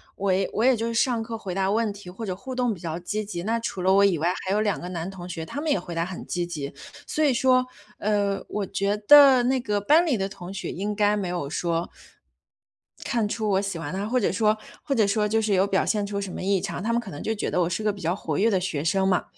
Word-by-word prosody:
我 195 -1 0
也 190 0 0
我 220 - -1
也 260 - +5
就 230 0 -2
是 230 - -2
上 235 -1 +2
课 225 0 -5
回 195 -5 -6
答 190 0 0
问 215 0 +1
题， 200 -3 -11
或 210 +5 -7
者 185 -3 -3
互 255 +7 -7
动 245 -3 +1
比 175 - -10
较 165 -1 -4
积 210 +5 -3
极。 175 -4 -5
那 230 +2 0
除 210 -5 -4
了 190 +1 +4
我 200 +1 +5
以 190 -5 +4
外， 170 +4 +1
还 190 - -1
有 210 +1 +2
2 205 -4 0
个 180 - -6
男 175 0 -4
同 180 -1 -9
学， 160 -2 -5
他 285 - -5
们 320 - -2
也 195 - +2
回 175 -1 -8
答 165 0 0
很 185 0 -7
积 175 -1 -2
极。 145 -5 -5 0.3
所 310 - -1
以 285 - +4
说， 255 0 +3 0.3
呃， 200 -1 0
我 205 -2 -3
觉 200 +2 -1
得 265 +2 +8
那 260 +1 +2
个 210 -4 -1
班 305 - +4
里 270 -9 +1
的 195 - -1
同 185 -2 -9
学 195 - -4
应 205 +3 -3
该 210 0 +3
没 200 -3 -2
有 175 -5 -3
说， 170 +1 -1 1.2
看 230 -3 0
出 215 -1 -2
我 195 0 +2
喜 195 -4 -4
欢 155 +1 -5
他， 195 +2 -2
或 250 +3 +1
者 210 - +1
说 215 +2 +2 0.3
或 280 - -1
者 220 -5 +3
说 210 +1 +1
就 220 +1 +1
是 210 -2 0
有 190 +1 +4
表 195 -1 +1
现 210 -2 0
出 200 0 -3
什 195 -1 -4
么 - - -5
异 195 0 +1
常， 180 -1 -4
他 230 - 0
们 235 - +1
可 215 - -9
能 145 - -7
就 220 - 0
觉 210 - -3
得 180 - +1
我 170 - +1
是 185 - -2
个 210 -1 +1
比 200 - -11
较 165 +2 0
活 155 -6 -3
跃 225 +3 +3
的 190 -3 +2
学 165 -6 -2
生 190 +3 +2
嘛。 185 -2 +2
200 Hz, 305 characters per minute, -25 LUFS, 180-225 Hz, 1.2 s, 得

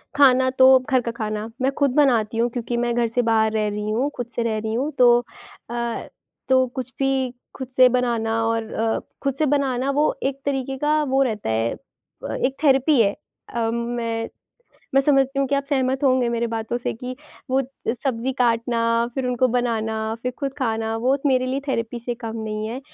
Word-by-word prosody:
खाना 260 -2 +5
तो 260 - +7
घर 255 0 +1
का 235 - -3
खाना, 215 -1 -4
मैं 265 +1 +2
खुद 280 -2 +2
बनाती 235 -7 +3
हूँ 235 +1 +2
क्योंकि 240 0 -3
मैं 240 0 0
घर 240 -1 +2
से 230 +2 0
बाहर 220 -1 +3
रह 215 -1 0
रही 210 +1 -3
हूँ, 250 +6 0
खुद 245 - -3
से 235 - 0
रह 225 -2 -1
रही 220 0 -3
हूँ 270 +6 -1
तो 240 -1 +6 0.5
अ, 235 -1 -3 0.4
तो 260 0 +5
कुछ 255 -1 -4
भी 270 -2 +1 0.2
खुद 260 - -6
से 255 0 +7
बनाना 230 -2 0
और 225 -1 -2
अ, 225 0 0 0.2
खुद 275 -1 +1
से 310 - +2
बनाना 270 -2 +1
वो 295 - +2
एक 275 0 -1
तरीके 270 -1 -2
का 300 +2 +2
वो 270 -1 +1
रहता 215 - -2
है 115 +1 0
अ, 275 - -11
एक 265 +1 0
थेरेपी 270 -1 +4
है। 200 -2 +3 0.4
अ, 230 -1 0
मैं 235 -1 -2 0.7
मैं 275 - +6
समझती 275 -1 +2
हूँ 275 - +2
कि 280 - +1
आप 280 0 0
सहमत 265 0 +1
होंगे 255 -2 +3
मेरे 235 0 0
बातों 225 0 -3
से 245 - -2
कि 250 +2 -7 0.3
वो 265 +1 +3
अ, 265 -2 -5
सब्ज़ी 260 -1 -1
काटना 230 0 +1
फिर 265 -2 -2
उनको 250 0 +2
बनाना, 220 -2 -1
फिर 250 - -2
खुद 275 -2 -2
खाना, 225 -3 -1
वो 250 +4 +2
एक 280 - -3
मेरे 255 -2 +2
लिए 265 +2 -1
थेरेपी 230 -2 -2
से 240 +1 -3
कम 230 -2 -6
नहीं 215 -1 -4
है। 245 +4 -5
245 Hz, 205 wpm, -22 LUFS, 225-265 Hz, 0.7 s, तो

